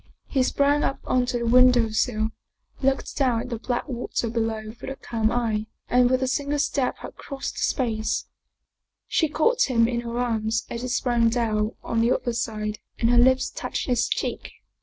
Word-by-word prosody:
He 270 - 0
sprang 285 +3 +2
up 275 - -1
onto 250 -1 +1
the 235 - -2
window 245 -1 +5
sill, 215 0 0 0.5
looked 270 0 0
down 250 -5 +2
at 250 - -7
the 230 - -3
black 245 +1 -2
water 235 -2 -3
below 225 -2 -2
with 235 +4 -8
a 270 - -5
calm 225 -4 -1
eye, 220 -3 -1 0.2
and 245 0 +4
with 255 +1 +2
a - - +1
single 285 +2 -1
step 280 -2 0
had - - -9
crossed 275 -1 -6
the - - -3
space. 220 -4 0 0.8
She 320 - +1
caught 465 - +2
him 230 -2 +4
in 235 0 -1
her 235 0 -5
arms 225 -2 0
as 235 - -4
he 250 - -3
sprang 240 -2 +2
down 220 -2 0
on 230 - 0
the 235 +2 +3
other 240 - -2
side 215 -2 -3 0.2
and 230 0 +2
her 245 - +4
lips 260 +1 +4
touched - - -4
his 245 -2 +1
cheek. - - -3
240 Hz, 190 wpm, -25 LUFS, 225-255 Hz, 0.8 s, window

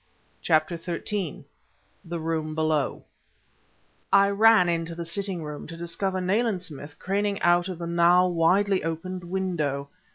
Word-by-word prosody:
CHAPTER 155 +1 +2
XIII 175 +1 -4 0.6
THE 170 0 -5
ROOM 160 -1 -2
BELOW 155 -3 0 1.1
I 200 0 +6
ran 215 -2 +5
into 165 -1 -1
the 170 0 -5
sitting 185 0 -2
room, 150 -1 -7
to 165 +1 -9
discover 185 +3 -2
Nayland 195 +1 0
Smith 145 -3 -8
craning 200 +1 -1
out 175 +1 +4
of 185 - -5
the 170 - -5
now 170 +1 +4
widely 185 +3 +2
opened 175 +3 -4
window. 170 -7 -2
175 Hz, 135 wpm, -26 LUFS, 165-190 Hz, 1.1 s, I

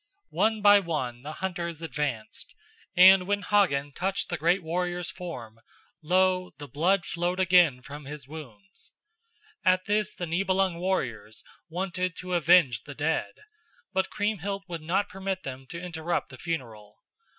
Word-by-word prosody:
One 220 -1 +1
by 205 0 +8
one 140 -10 -3
the 145 +3 -7
hunters 170 -3 -4
advanced, 140 -7 -4 0.4
and 185 0 +8
when 205 0 0
Hagen 160 -9 +2
touched 190 +6 -2
the 175 - -2
great 175 +5 +2
warrior's 175 +1 -2
form, 125 - -8 0.4
lo, 185 +2 +2
the 145 0 -8
blood 175 +7 +1
flowed 175 +2 -2
again 175 -8 +4
from 145 +2 -9
his 145 -2 -8
wounds. 155 - -12 0.7
At 185 0 +3
this 210 -1 0
the 175 - -4
Nibelung 185 +1 +1
warriors 120 - -2 0.3
wanted 180 +1 -2
to 180 0 -5
avenge 170 -9 +4
the 145 - -9
dead, 160 +2 -2 0.5
but 190 -1 +1
Kriemhild 200 -1 -2
would 170 -3 -5
not 190 +6 0
permit 195 -1 -4
them 135 -1 -7
to 170 - -7
interrupt 170 -1 -3
the 130 - -12
funeral. 115 -11 -5
175 Hz, 145 wpm, -27 LUFS, 145-190 Hz, 0.7 s, by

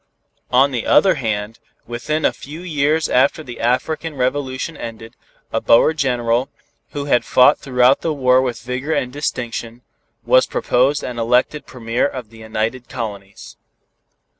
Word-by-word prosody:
On 135 +3 +4
the 120 -3 -3
other 190 -2 +5
hand, 110 -5 -3 0.3
within 150 +7 -2
a - - +2
few 155 +5 -10
years 155 -2 0
after 140 +5 +2
the 120 -4 -9
African 150 +6 -1
Revolution 130 +3 -2
ended, 115 -1 -8 0.4
a - - 0
Boer 135 +7 +5
General, 125 -3 0 0.4
who 145 -1 -3
had 130 -4 +2
fought 125 - +5
throughout 125 0 +3
the 165 - -1
war 130 -3 +3
with 120 -4 -3
vigor 130 +5 -3
and 125 -4 -2
distinction, 120 -4 -4 0.4
was - - +4
proposed 135 +4 +1
and 120 -2 -5
elected 125 +6 +1
Premier 120 0 -1
of 125 -6 -8
the 115 - -14
United 110 +3 -3
Colonies. 100 -5 -7
125 Hz, 145 wpm, -19 LUFS, 120-145 Hz, 0.4 s, other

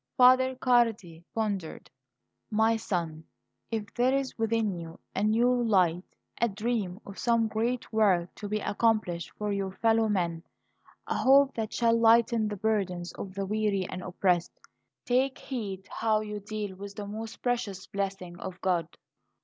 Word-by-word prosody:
Father 255 0 +6
Cardi 230 -10 +1
pondered. 200 -7 -3 0.6
"My 220 +1 +3
son, 170 -7 -3 0.4
if 215 -3 -4
there 255 +2 +2
is 275 -1 -2
within 225 -2 0
you 165 -1 -9 0.2
a - - 0
new 230 +4 +3
light, 185 -6 +2 0.4
a 235 - +4
dream 210 -3 -2
of 200 - -9
some 230 -2 +2
great 230 +3 -2
work 190 -6 +3
to 205 - -7
be 215 - 0
accomplished 210 -6 0
for 210 -1 -2
your 195 -1 -2
fellow 225 +1 +2
men, 170 -5 0 0.6
a - - -2
hope 275 +1 +5
that 220 -1 -3
shall 230 -1 +3
lighten 230 -1 +4
the 210 - -3
burdens 185 -4 -1
of 190 -1 -7
the 195 0 -2
weary 205 -2 0
and 185 - -6
oppressed, 180 -1 0 0.5
take 260 +2 +1
heed 205 -7 -5
how 220 -1 +1
you 210 -1 -5
deal 205 -1 -5
with 200 +1 -9
the 205 - -5
most 220 +2 -7
precious 210 -6 -1
blessing 195 -3 -4
of 185 -1 -7
God. 175 -4 0
210 Hz, 155 wpm, -29 LUFS, 190-230 Hz, 0.6 s, Father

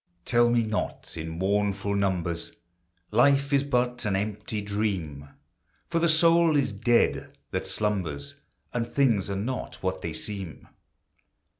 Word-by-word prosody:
Tell 120 0 +4
me 120 -1 +3
not, 110 -1 -3
in 80 0 -5
mournful 100 +3 0
numbers, 90 -4 -1 0.6
Life 140 +5 +4
is 140 0 +4
but 125 -3 0
an 105 -3 0
empty 105 +2 -2
dream! 95 -9 -3 0.6
For 165 - +2
the 170 0 +3
soul 165 0 +5
is 140 - +1
dead 120 -2 +1
that - - -2
slumbers, 90 -10 -2 0.4
And 115 -1 -1
things 115 -9 +2
are 100 - -2
not 115 +4 -4
what 95 0 -1
they 85 - -4
seem. 95 0 -6
105 Hz, 135 wpm, -27 LUFS, 95-125 Hz, 0.6 s, soul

